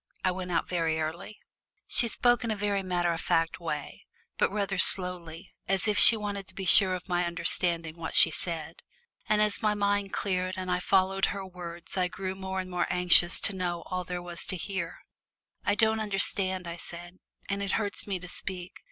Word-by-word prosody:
I 185 - +3
went 180 0 -6
out 165 - 0
very 165 -3 -1
early." 170 +7 -5 0.5
She 235 - +3
spoke 245 +2 +2
in 230 - -3
a 215 - 0
very 205 -1 -1
matter 175 -2 -1
of 165 - -5
fact 165 0 0
way, 150 -4 -6 0.3
but - - +2
rather 200 -2 -2
slowly, 180 -1 0
as 195 +2 +1
if 210 - +2
she 230 - +9
wanted 200 -2 -5
to 190 - -11
be 195 - -5
sure 185 0 +7
of 180 - -9
my 175 -1 0
understanding 170 -1 -1
what 165 -1 -5
she 165 - +8
said. 165 -1 -2 0.5
And 210 0 +3
as 210 -1 0
my 210 -1 +1
mind 205 -1 0
cleared 185 -1 -2
and 185 -1 -4
I 180 - +1
followed 190 +1 +2
her 195 -1 -4
words 175 -1 -7
I 180 -1 +2
grew 190 +1 -5
more 190 0 -5
and 185 0 -6
more 180 -1 -1
anxious 180 0 +5
to 200 - +1
know 175 -2 -3
all 185 0 -2
there 180 0 -6
was 175 -1 -5
to 185 - -2
hear. 185 -2 -5 0.6
"I - - +1
don't 220 0 +2
understand," 195 -3 0
I 170 0 -6
said, 175 +1 -10 0.3
"and 200 0 -3
it 200 -1 -2
hurts 205 -2 -1
me 195 -2 -2
to 180 - -8
speak. 180 0 -7
185 Hz, 205 wpm, -28 LUFS, 175-200 Hz, 0.6 s, she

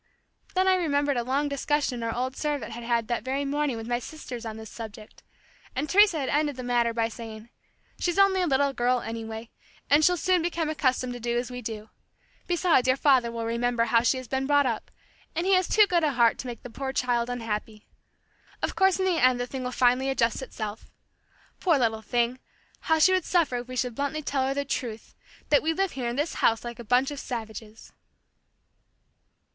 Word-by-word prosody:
Then 375 +1 +3
I 380 - +6
remembered 290 -5 +1
a 240 - 0
long 275 +4 0
discussion 280 -3 -1
our 230 0 -1
old 255 +2 -2
servant 290 -7 -2
had 235 +1 -7
had 230 -1 0
that 240 -1 -1
very 270 +3 -2
morning 285 -3 -1
with 225 0 -7
my 240 0 0
sisters 245 -3 -8
on 220 0 -6
this 220 -1 -10
subject, 215 -2 -10 0.5
and 280 +4 -1
Teresa 395 -2 +5
had 265 - -2
ended 295 -1 +1
the 255 - -6
matter 240 -1 +1
by 230 0 0
saying, 225 -1 -9 0.5
"She's 350 0 -1
only 395 -1 +4
a 360 - +1
little 280 -1 +2
girl, 245 0 +1
anyway, 225 0 -6 0.4
and 295 +2 +6
she'll 360 +3 +4
soon 365 +1 +2
become 330 -2 -1
accustomed 255 -4 0
to 245 - -7
do 240 0 -1
as 245 +1 -3
we 250 0 -6
do. 220 -1 -7 0.6
Besides 345 -7 +3
your 260 +1 +3
father 260 -5 +3
will 230 -1 -4
remember 235 +1 0
how 230 0 +3
she 245 +2 +2
has 255 -1 -7
been 265 +1 -1
brought 285 -1 +4
up, 230 -4 -2 0.5
and 335 +2 -1
he 385 - +3
has 370 -1 +3
too 425 -1 +5
good 350 -4 +1
a 300 -2 +2
heart 235 -2 +3
to 255 - -5
make 240 -2 -7
the 245 - -9
poor 270 +2 -4
child 245 -2 0
unhappy. 220 -3 -4 0.8
Of - - -1
course 385 -1 +4
in 380 - 0
the 355 -6 +1
end 255 -1 +5
the 245 - -1
thing 260 +1 -6
will 250 - -3
finally 250 +2 +2
adjust 235 -3 +1
itself. 215 -4 -6 0.7
Poor 335 -6 +3
little 225 -4 0
thing! 240 +3 0 0.4
How 320 - +2
she 375 +4 +5
would 370 -2 +2
suffer 330 -9 +2
if 245 0 -6
we 255 - -7
should 250 -1 -1
bluntly 285 +5 -3
tell 270 -2 0
her 270 - -1
the 280 0 -1
truth 235 -5 -4 0.4
that 290 - +5
we 325 +1 0
live 385 +1 0
here 250 -3 -3
in 240 - -3
this 295 +4 -1
house 225 -1 +3
like 240 0 -7
a - - -6
bunch 250 +5 +2
of 290 - -6
savages." 220 -3 -7
255 Hz, 215 wpm, -27 LUFS, 235-295 Hz, 0.8 s, I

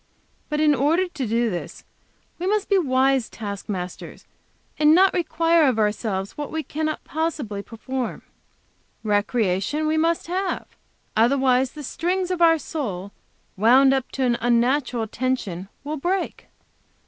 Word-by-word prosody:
But 300 -1 -1
in 305 -1 +4
order 315 +7 +2
to 295 -8 -4
do 230 +1 +1
this 175 - -6 0.6
we 360 - -2
must 415 0 0
be 400 - +4
wise 265 -4 +2
task 205 -1 -7
masters, 180 -3 -6 0.5
and 305 +1 +6
not 380 +2 +5
require 330 -2 +2
of 250 -4 +1
ourselves 210 -2 -1
what 295 -1 -5
we 320 0 -2
cannot 310 +1 -3
possibly 295 -10 -3
perform. 245 +3 -5 0.8
Recreation 210 +5 0
we 310 +1 +1
must 330 +1 +1
have. 370 +2 -2 0.5
Otherwise 255 +2 +3
the 300 - -8
strings 360 +6 -1
of 360 -1 -2
our 330 -1 +6
soul, 205 - -5 0.4
wound 255 +7 +5
up 265 -2 -1
to 270 - -1
an 240 -2 +1
unnatural 240 0 +1
tension, 210 -7 -2 0.2
will 300 +2 -4
break." 360 +6 -2
270 Hz, 140 wpm, -23 LUFS, 225-320 Hz, 0.8 s, and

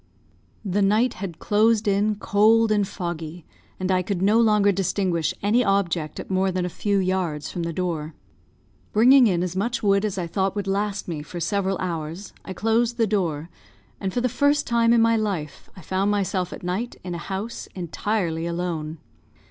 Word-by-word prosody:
The 200 +1 0
night 215 +5 +3
had 180 -5 -5
closed 215 +1 +2
in 205 +1 +2
cold 215 +2 +3
and 205 -2 +2
foggy, 170 -3 -6 0.3
and 185 0 -1
I 185 -1 +3
could 185 0 -2
no 205 +4 +3
longer 210 -3 +4
distinguish 185 -3 0
any 225 +5 +3
object 180 -7 0
at - - -7
more 190 0 +2
than 180 -1 -1
a - - -2
few 200 +3 -1
yards 185 -5 -1
from 175 - -4
the 170 0 -2
door. 165 -3 -3 0.8
Bringing 250 +3 +7
in 180 -3 +1
as 180 0 -3
much 235 +5 -1
wood 200 0 +3
as 205 -3 -2
I 180 - -1
thought 190 +3 -1
would 205 -2 -2
last 200 +1 -2
me 160 -4 -4
for 175 +3 -7
several 195 +2 0
hours, 170 +1 -4
I - - -8
closed 225 +4 +1
the 230 - +3
door; 175 -6 -1 0.5
and 190 -2 -2
for 245 - -1
the 250 - +2
first 285 +4 +2
time 235 -1 +3
in 235 -1 +5
my 230 0 +4
life 190 -9 -3
I - - -10
found 190 +4 0
myself 190 -3 0
at - - -9
night 190 +7 -3
in 180 -1 -5
a 170 - -4
house 200 +6 -5
entirely 170 -1 -2
alone. 170 -2 -3
195 Hz, 190 wpm, -24 LUFS, 175-210 Hz, 0.8 s, Bringing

